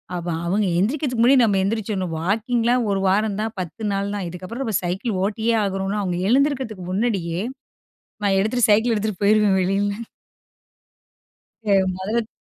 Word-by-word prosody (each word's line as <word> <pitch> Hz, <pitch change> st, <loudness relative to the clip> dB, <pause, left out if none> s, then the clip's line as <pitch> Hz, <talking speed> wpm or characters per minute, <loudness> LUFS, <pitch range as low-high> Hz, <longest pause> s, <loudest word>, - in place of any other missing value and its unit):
அப்போ 175 Hz, 0 st, -3 dB, 0.2 s
அவங்க 200 Hz, +4 st, +1 dB
எந்திரிக்கிறதுக்கு 250 Hz, -, 0 dB
முன்னாடி 255 Hz, +1 st, +6 dB
நம்ம 205 Hz, -3 st, +2 dB
எந்திரிச்சிடணும் 195 Hz, -4 st, -2 dB
வாக்கிங்லாம் 230 Hz, +5 st, +1 dB
1 195 Hz, -, +1 dB
வாரம் 205 Hz, +1 st, +1 dB
தான் 220 Hz, +1 st, -3 dB
10 180 Hz, +4 st, -6 dB
நாள் 200 Hz, +1 st, -2 dB
தான் 195 Hz, -3 st, -3 dB
இதுக்கப்புறம் 185 Hz, +9 st, -6 dB
நம்ம 220 Hz, -3 st, -1 dB
சைக்கிள் 190 Hz, +3 st, -2 dB
ஓட்டியே 220 Hz, +3 st, 0 dB
ஆகணும்னா, 195 Hz, +1 st, -1 dB
அவங்க 180 Hz, -2 st, -2 dB
எழுந்துருக்கிறதுக்கு 260 Hz, -7 st, +1 dB
முன்னாடியே 190 Hz, -5 st, -1 dB, 0.8 s
நான் 195 Hz, -1 st, +3 dB
எடுத்துட்டு 220 Hz, +4 st, +2 dB
சைக்கிள் 225 Hz, +3 st, +4 dB
எடுத்துகிட்டு 210 Hz, -2 st, -2 dB
போயிடுவேன் 210 Hz, -1 st, +4 dB
வெளில 200 Hz, +3 st, 0 dB, 1.6 s
து 205 Hz, -, +1 dB, 0.2 s
மொதல்ல 190 Hz, +4 st, -4 dB
த் 220 Hz, -, -10 dB
205 Hz, 145 wpm, -22 LUFS, 190-230 Hz, 1.6 s, முன்னாடி